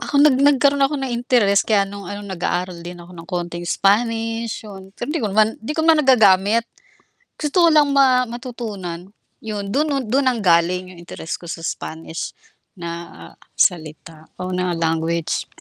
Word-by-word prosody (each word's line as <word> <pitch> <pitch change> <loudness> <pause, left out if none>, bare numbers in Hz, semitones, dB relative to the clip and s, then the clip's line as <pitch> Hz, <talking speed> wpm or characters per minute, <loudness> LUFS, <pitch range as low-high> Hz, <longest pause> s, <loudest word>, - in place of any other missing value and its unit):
Ako 285 - -3
nag 275 -4 +5
nagkaroon 280 0 +4
ako 275 +2 +2
ng 265 -2 -3
interes 235 -5 +3
kaya 205 -3 +2
nung 200 -1 -9
ano 205 0 -6
nag-aaral 180 -2 -3
din 175 +1 -8
ako 175 +1 -13
ng 165 -1 -12
konting 175 -1 -4
Spanish 225 +3 0
yun 190 -2 -10
pero 260 +5 -4
'di 330 - -1
ko 215 - -1
naman 215 +2 +3
'di 225 +7 -4
ko 320 - +1
naman 325 -1 +5
nagagamit. 220 -4 +4 0.7
Gusto 315 +4 +2
ko 335 - +6
lang 295 -2 +5
ma 260 -3 +3
matutunan, 215 -8 -6 0.3
yun 210 -2 -5
dun 305 +2 +1 0.2
dun 265 +5 +1
nanggaling 180 -4 +1
yung 175 - -14
interes 170 -1 -7
ko 170 - -9
sa 165 0 -5
Spanish 160 0 -6 0.4
na 170 - -8 0.2
salita 160 -1 -1
o 185 0 -4
na 180 -2 -1
language. 165 0 -1
200 Hz, 165 wpm, -20 LUFS, 175-245 Hz, 0.7 s, ko